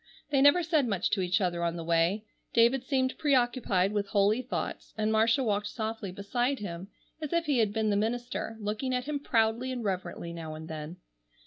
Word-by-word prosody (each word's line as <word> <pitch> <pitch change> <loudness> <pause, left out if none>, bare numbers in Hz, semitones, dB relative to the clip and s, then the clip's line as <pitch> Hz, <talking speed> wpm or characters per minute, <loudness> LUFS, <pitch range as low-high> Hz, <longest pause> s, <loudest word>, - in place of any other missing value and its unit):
They 275 -2 +3
never 285 +6 +6
said 310 -5 +2
much 195 -4 0
to 195 - +1
each 180 0 +1
other 175 -2 0
on 170 0 0
the 170 - -5
way. 170 +6 +1 0.3
David 235 +3 +4
seemed 260 -1 0
preoccupied 245 -9 +2
with 205 -1 0
holy 205 +4 +2
thoughts, 255 - -5
and 215 0 +1
Marcia 225 +4 +3
walked 210 -2 0
softly 220 -3 -4
beside 240 +8 -1
him 185 -3 -6 0.3
as 305 - -4
if 340 0 +1
he 285 -5 +2
had 215 -3 +2
been 215 0 0
the - - +2
minister, 225 +1 -2
looking 215 +5 -2
at 250 0 -2
him 295 0 -2
proudly 230 0 +1
and 245 -2 -4
reverently 180 -3 -3
now 160 -2 -6
and 160 +1 -8
then. 160 +1 -6
220 Hz, 200 wpm, -29 LUFS, 190-255 Hz, 0.3 s, never